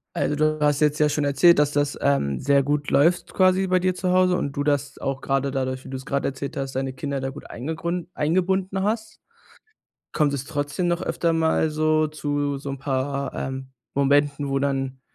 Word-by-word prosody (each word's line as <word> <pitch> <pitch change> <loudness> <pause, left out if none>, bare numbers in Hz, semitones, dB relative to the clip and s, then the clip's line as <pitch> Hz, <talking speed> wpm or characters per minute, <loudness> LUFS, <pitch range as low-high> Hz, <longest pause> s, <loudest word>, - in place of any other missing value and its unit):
Also, 150 - 0
du 155 0 +1
hast 145 -1 +2
jetzt 150 0 +2
ja 150 - +5
schon 150 0 0
erzählt, 145 +5 +5
dass 145 0 +3
das, 145 -1 0
ähm, 70 - +1
sehr 140 -1 +3
gut 145 +1 -1
läuft 170 +5 +2
quasi 185 0 +3
bei 185 0 +3
dir 185 0 0
zu 180 0 -1
Hause 185 0 +4
und 140 - -2
du 145 - +1
das 145 -1 0
auch, 135 -1 -3
grade 135 0 0
dadurch, 130 -1 -3
wie - - -9
du's 130 0 -6
gerade 140 0 -1
erzählt 135 +1 -5
hast, 135 -1 -4
deine 135 0 -1
Kinder 140 +1 -4
da 135 - -2
gut 140 +2 -11
eingegrun 165 +6 -4
eingebunden 185 +4 0
hast. 220 +1 -3 0.9
Kommt 150 -3 +2
es 140 -1 -3
trotzdem 145 +4 -2
noch 175 +1 0
öfter 170 -2 0
mal 160 -1 +2
so 155 0 +2
zu 145 -2 -2
so 140 - -6
'n 135 - -4
paar, 140 +1 -2
ähm, 130 0 -5 0.2
Momenten, 145 +1 +2
wo 135 - 0
dann 135 -1 -2
145 Hz, 200 wpm, -24 LUFS, 135-165 Hz, 0.9 s, ja